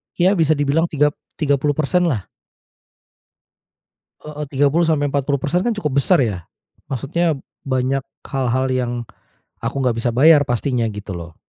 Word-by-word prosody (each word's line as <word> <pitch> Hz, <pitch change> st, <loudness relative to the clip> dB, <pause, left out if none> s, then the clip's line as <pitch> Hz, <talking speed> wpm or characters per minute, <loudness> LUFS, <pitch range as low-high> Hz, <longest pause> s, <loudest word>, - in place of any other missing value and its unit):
ya 185 Hz, +2 st, +3 dB
bisa 160 Hz, -3 st, +3 dB
dibilang 145 Hz, +3 st, +1 dB
tigap 150 Hz, -2 st, +2 dB, 0.2 s
tiga 145 Hz, -3 st, +2 dB
puluh 145 Hz, +1 st, 0 dB
persen 175 Hz, +4 st, +1 dB
lah. 120 Hz, -, -1 dB, 2.0 s
Heeh, 150 Hz, 0 st, -6 dB
30 145 Hz, +5 st, +2 dB
sampai 150 Hz, -3 st, +1 dB
40% 140 Hz, +5 st, 0 dB
kan 240 Hz, -, +2 dB
cukup 150 Hz, -10 st, -2 dB
besar 160 Hz, +3 st, +4 dB
ya, 100 Hz, -9 st, -2 dB, 0.4 s
maksudnya 155 Hz, +6 st, -1 dB, 0.3 s
banyak 130 Hz, 0 st, 0 dB, 0.2 s
hal-hal 130 Hz, -1 st, -1 dB
yang, 125 Hz, -2 st, 0 dB, 0.7 s
aku -, -, -3 dB
nggak 125 Hz, -3 st, +1 dB
bisa 115 Hz, +1 st, 0 dB
bayar 145 Hz, +5 st, +6 dB
pastinya 120 Hz, -2 st, 0 dB
gitu 105 Hz, -2 st, -7 dB
loh. 85 Hz, -1 st, -8 dB
140 Hz, 140 wpm, -20 LUFS, 130-155 Hz, 2.0 s, bayar